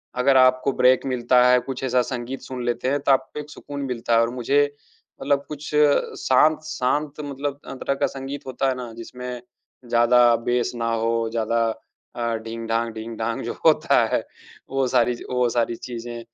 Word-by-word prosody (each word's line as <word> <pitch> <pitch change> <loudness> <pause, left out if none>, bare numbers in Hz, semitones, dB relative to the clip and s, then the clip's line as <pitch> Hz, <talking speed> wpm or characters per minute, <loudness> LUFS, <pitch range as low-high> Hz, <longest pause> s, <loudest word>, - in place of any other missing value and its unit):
अगर 130 +1 +4
आपको 130 +1 +4
ब्रेक 130 +1 +4
मिलता 125 0 +3
है, 125 0 +5
कुछ 130 +1 -6
ऐसा 125 -1 +2
संगीत 125 +1 -5
सुन 125 -2 -6
लेते 120 +1 -1
हैं, 145 +1 +1
तो 140 - +1
आपको 135 +2 0
एक 150 0 -8
सुकून 145 -1 -8
मिलता 120 -2 -2
है। 115 - +5
और 115 - +1
मुझे 140 +4 +2 0.6
मतलब 140 0 +1
कुछ 150 0 -7 0.5
शांत 155 +4 +4
शांत 150 0 -1
मतलब 140 0 -4
अ, - - -6
तरह 135 +1 -2
का - - +1
संगीत 135 +1 -7
होता 130 +1 0
है 130 - -1
ना, 125 -2 -6
जिसमें 125 +1 -7 0.5
ज़्यादा 120 0 +5
बेस 120 -1 +1
ना 115 -1 -1
हो, 115 0 0
ज़्यादा 115 0 0 0.5
अ, 115 -1 -1
ढिंग-ढांग, 115 0 -2
ढिंग-ढांग 115 0 -4
जो - - -3
होता - - +4
है, - - +1 0.5
वो 135 -1 0
सारी 125 -1 +2 0.2
वो 125 -1 +2
सारी 120 0 0
चीजें, 120 0 -7
125 Hz, 175 wpm, -23 LUFS, 115-135 Hz, 0.6 s, है